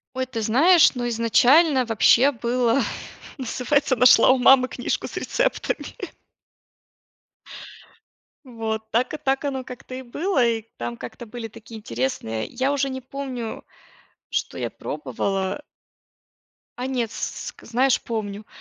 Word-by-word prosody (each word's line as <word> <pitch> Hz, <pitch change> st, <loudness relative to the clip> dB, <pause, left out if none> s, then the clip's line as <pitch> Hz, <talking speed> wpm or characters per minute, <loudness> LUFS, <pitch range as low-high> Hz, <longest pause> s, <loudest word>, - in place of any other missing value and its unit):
Ой, 260 Hz, 0 st, -1 dB
ты 230 Hz, -3 st, -4 dB
знаешь, 300 Hz, -, +5 dB
ну, 245 Hz, 0 st, -2 dB
изначально 255 Hz, +5 st, +4 dB
вообще 235 Hz, +5 st, +4 dB
было 240 Hz, +1 st, +1 dB, 0.6 s
называется 260 Hz, +2 st, 0 dB
нашла 245 Hz, 0 st, +7 dB
у 260 Hz, -, +4 dB
мамы 255 Hz, 0 st, +6 dB
книжку 245 Hz, -, -3 dB
с -, -, -10 dB
рецептами. -, -, -1 dB, 2.6 s
Вот. 220 Hz, -2 st, -5 dB
Так 245 Hz, +6 st, 0 dB
и -, -, -1 dB
так 270 Hz, 0 st, -1 dB
оно 265 Hz, -2 st, -3 dB
как-то 255 Hz, 0 st, -10 dB
и 260 Hz, -, -6 dB
было, 290 Hz, +3 st, 0 dB
и 225 Hz, -1 st, 0 dB, 0.2 s
там 120 Hz, 0 st, -4 dB
как-то 125 Hz, -, -9 dB
были 225 Hz, 0 st, -7 dB
такие 225 Hz, 0 st, -11 dB
интересные 115 Hz, -, -3 dB
я 260 Hz, +3 st, -1 dB
уже 275 Hz, -1 st, 0 dB
не 260 Hz, 0 st, -5 dB
помню, 260 Hz, -3 st, -6 dB, 0.7 s
что -, -, -2 dB
я -, -, -3 dB
пробовала. 195 Hz, +7 st, -3 dB, 1.2 s
А 250 Hz, -, -3 dB
нет, 245 Hz, -4 st, -2 dB
с -, -, -5 dB
ск -, -, -12 dB
знаешь, 255 Hz, +3 st, +2 dB
помню. 215 Hz, -2 st, -5 dB
245 Hz, 130 wpm, -23 LUFS, 225-265 Hz, 2.6 s, нашла